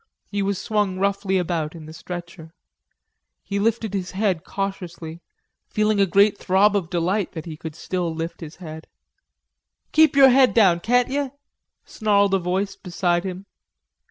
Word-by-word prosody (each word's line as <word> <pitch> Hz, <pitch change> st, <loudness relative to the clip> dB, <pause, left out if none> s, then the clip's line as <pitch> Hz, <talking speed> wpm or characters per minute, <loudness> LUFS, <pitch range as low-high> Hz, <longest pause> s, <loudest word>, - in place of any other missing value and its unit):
He 205 Hz, -1 st, -1 dB
was 200 Hz, -1 st, -1 dB
swung 205 Hz, -3 st, -1 dB
roughly 200 Hz, 0 st, 0 dB
about 170 Hz, -3 st, -2 dB
in 160 Hz, -2 st, -10 dB
the 155 Hz, -, -10 dB
stretcher. 170 Hz, -1 st, -9 dB, 0.9 s
He 200 Hz, -, -3 dB
lifted 220 Hz, 0 st, 0 dB
his 185 Hz, -2 st, -3 dB
head 190 Hz, -4 st, 0 dB
cautiously, 175 Hz, -4 st, -5 dB, 0.5 s
feeling 215 Hz, -1 st, +1 dB
a 195 Hz, -, +4 dB
great 200 Hz, +3 st, +3 dB
throb 200 Hz, +2 st, +3 dB
of 185 Hz, -5 st, -1 dB
delight 180 Hz, +3 st, -1 dB
that 160 Hz, -, -6 dB
he 160 Hz, -2 st, -7 dB, 0.2 s
still 175 Hz, +2 st, -3 dB
could 160 Hz, -, -6 dB
lift 165 Hz, +2 st, -5 dB
his 155 Hz, -1 st, -8 dB
head. 160 Hz, -3 st, -9 dB, 1.0 s
"Keep 315 Hz, -2 st, +5 dB
yer 270 Hz, -1 st, +8 dB
head 260 Hz, 0 st, +4 dB
down, 190 Hz, -7 st, +5 dB
can't 245 Hz, +6 st, +2 dB
yer?" 280 Hz, -1 st, -2 dB, 0.5 s
snarled 200 Hz, -3 st, +1 dB
a 195 Hz, -, +3 dB
voice 190 Hz, +3 st, -2 dB
beside 175 Hz, -1 st, -1 dB
him. 190 Hz, 0 st, -6 dB
190 Hz, 155 wpm, -23 LUFS, 175-205 Hz, 1.0 s, yer